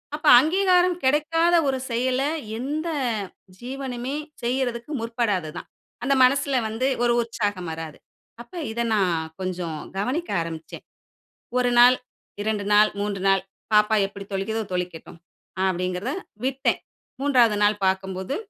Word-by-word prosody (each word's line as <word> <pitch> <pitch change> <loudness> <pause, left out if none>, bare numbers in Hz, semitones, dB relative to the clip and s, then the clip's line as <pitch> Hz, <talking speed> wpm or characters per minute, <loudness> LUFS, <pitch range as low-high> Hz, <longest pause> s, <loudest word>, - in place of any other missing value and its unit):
அப்போ, 300 0 -4
அங்கீகாரம் 360 +2 +3
கிடைக்காத 330 +5 +3
ஒரு 265 -1 0
செயல, 255 +3 0 0.4
எந்த 300 +6 -3 0.7
ஜீவனுமே 260 +1 -5 0.3
செய்றதுக்கு 245 +1 -2
முற்படாததுதான். 210 -9 -2 0.4
அந்த 275 - +3
மனசில 270 -1 +3
வந்து 225 +5 -1 0.2
ஒரு 240 - +3
உற்சாகம் 205 -6 -3
வராது. 160 -1 -7 0.4
அப்ப, 235 - -16 0.2
இதை 235 +1 -1
நான் 170 -5 0
கொஞ்சம் 175 -4 -3 0.2
கவனிக்க 265 - -2
ஆரம்பிச்சேன், 165 -1 -7 0.7
1 245 -1 +2
நாள், 250 +1 +8 0.5
2 210 -1 -1
நாள், 210 +1 +6
3 200 -2 -2
நாள், 195 -1 +3 0.3
பாப்பா 210 +1 +5
எப்படி 200 0 -10
தொளிக்கிதோ, 220 +3 -1
தொளிக்கட்டும். 175 -2 -5 0.5
அப்பிடிங்கிறத 185 +6 -1 0.3
விட்டன், 270 0 +1 0.4
3வது 245 -7 +4
நாள் 205 0 +2
பார்க்கும்போது, 190 +4 -1
230 Hz, 115 wpm, -24 LUFS, 190-265 Hz, 0.7 s, நாள்